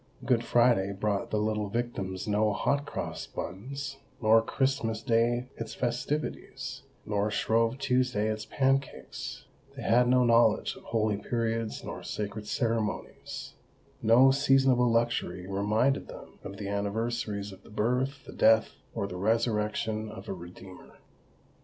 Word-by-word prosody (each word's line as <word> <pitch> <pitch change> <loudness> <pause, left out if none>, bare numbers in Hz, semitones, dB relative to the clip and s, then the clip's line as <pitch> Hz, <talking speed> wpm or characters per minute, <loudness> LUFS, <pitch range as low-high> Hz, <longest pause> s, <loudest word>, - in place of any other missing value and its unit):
Good 120 -3 +2
Friday 120 -5 +3
brought 100 0 -1
the 110 - 0
little 105 -1 0
victims 100 -5 -3
no 105 0 +2
hot 140 +6 0
cross - - -4
buns, 135 +9 -6 0.2
nor 115 0 +5
Christmas 115 -3 -1
Day 120 +2 +2
its 115 - -6
festivities, 125 +5 -3 0.2
nor 105 0 0
Shrove 115 +3 +1
Tuesday 125 -5 +1
its 110 0 -3
pancakes:—they 135 0 -3
had 120 +2 +4
no 125 0 +5
knowledge 115 0 +4
of - - -15
holy 110 -2 +1
periods 115 +1 -2
nor - - -6
sacred 105 0 -5
ceremonies;—no 115 +2 0
seasonable 135 -3 +4
luxury 115 -6 0
reminded 105 +8 +1
them - - -12
of 100 - -7
the 100 - -5
anniversaries 105 0 -2
of 95 0 -13
the - - -17
birth, 125 +6 -1
the - - -10
death, 110 0 +4 0.2
or 105 -3 -1
the 90 -2 -6
resurrection 110 +1 0
of 110 - -9
a - - -2
Redeemer. 90 +1 -12
115 Hz, 130 wpm, -29 LUFS, 105-125 Hz, 0.2 s, nor